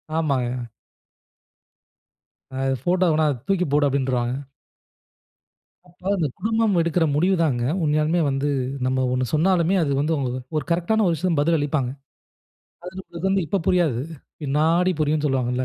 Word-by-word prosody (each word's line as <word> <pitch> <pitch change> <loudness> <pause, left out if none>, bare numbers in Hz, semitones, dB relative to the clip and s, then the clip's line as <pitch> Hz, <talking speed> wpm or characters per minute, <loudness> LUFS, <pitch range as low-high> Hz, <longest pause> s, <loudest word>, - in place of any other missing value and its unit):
ஆமாங்க. 125 -6 -1 1.9
அ - - -4 0.2
ஃபோட்டோ 180 +4 +2
வேணா, 155 0 +2
அது 130 - -4
தூக்கி 190 -2 +1
போடு 145 0 +3
அப்டின்ருவாங்க. 130 -3 0 1.5
அப்ப 175 0 -24 0.2
அந்த 165 -4 +1
குடும்பம் 220 -3 +1
எடுக்குற 165 0 +1
முடிவு 185 +5 +3
தாங்க, 125 -7 0 0.2
உண்மையாலுமே 155 +3 +1
வந்து 135 +1 -1 0.4
நம்ம 130 0 +1
ஒண்ணு 130 0 0
சொன்னாலுமே, 175 +3 +2
அது 140 - -1
வந்து 155 +3 0 0.4
ஒரு 150 - -1
கரெக்ட் 170 +3 0
ஆன 220 0 +3
ஒரு 170 - +2
விஷயத்துக்கு 160 -1 0
பதில் 165 +2 +2
அளிப்பாங்க. 145 -3 -1 1.0
அது 185 -1 -6
வந்து 195 0 +2
இப்ப 190 +5 -1
புரியாது, 165 -10 +2 0.4
பின்னாடி 160 +6 +2
புரியும்னு 150 0 +1
சொல்லுவாங்கள்ல 130 -2 0
155 Hz, 135 wpm, -23 LUFS, 135-180 Hz, 1.9 s, போடு